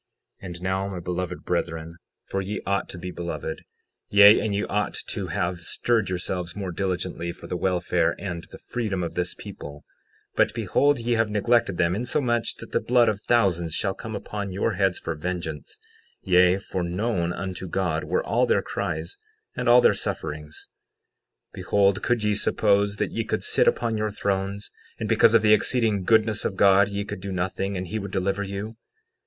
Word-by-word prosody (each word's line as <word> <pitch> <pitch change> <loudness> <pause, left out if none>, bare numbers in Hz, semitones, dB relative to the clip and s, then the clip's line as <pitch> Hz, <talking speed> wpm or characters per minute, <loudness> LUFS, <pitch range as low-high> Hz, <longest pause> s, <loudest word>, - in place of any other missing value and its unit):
60:10 - - -10
And 85 0 -8
now, 95 +1 -1
my 95 -2 -5
beloved 90 +1 -4
brethren—for 85 +2 -4
ye 100 +2 -4
ought 100 0 -1
to - - -7
be 90 +1 -6
beloved; 80 -3 -5 0.5
yea, 100 +1 +8
and 105 -2 -1
ye 105 - 0
ought 105 -1 -1
to - - -3
have 85 0 -2
stirred 110 +4 +1
yourselves 90 -1 -3
more 95 -3 -4
diligently 90 -1 -2
for - - -12
the - - -4
welfare 90 -2 +1
and 85 -4 -5
the - - -9
freedom 105 -6 -3
of 85 - -4
this 90 0 -2
people; 75 -1 -10 0.5
but - - +2
behold, 145 0 +2
ye 120 +1 0
have 115 -1 +2
neglected 105 -2 +2
them 85 +1 +2
insomuch 120 0 0
that - - -11
the - - +2
blood 120 -1 +3
of 105 -1 -3
thousands 85 -9 +2
shall 95 -2 0
come 110 +2 -7
upon 100 -1 -5
your 100 +4 0
heads 95 -1 +1
for 80 - -4
vengeance; 80 -2 -5 0.5
yea, 90 0 +5
for 95 -1 -4
known 90 0 -1
unto 95 0 -4
God 85 -3 -1
were - - -1
all - - +2
their 470 - +2
cries, 400 - -4 0.4
and 125 - 0
all 120 +1 +8
their - - +5
sufferings— 75 0 -4 0.8
60:11 - - -49
Behold, 100 -1 +2
could 120 -3 0
ye 105 0 +2
suppose 100 0 +2
that - - -2
ye 115 - -2
could - - -2
sit - - +2
upon 115 -2 +1
your 110 0 0
thrones, 100 0 -2 0.3
and - - -2
because 115 - +5
of 110 - +5
the 105 0 +6
exceeding 110 -2 +2
goodness 110 +1 +3
of 95 - -2
God 100 +1 +5
ye 100 0 -3
could 95 - -6
do 100 0 -5
nothing 95 +2 -2
and 90 - -3
he 110 +5 -3
would 100 0 -5
deliver 95 +1 -1
you? 100 +3 -5
95 Hz, 185 wpm, -25 LUFS, 90-105 Hz, 0.8 s, yea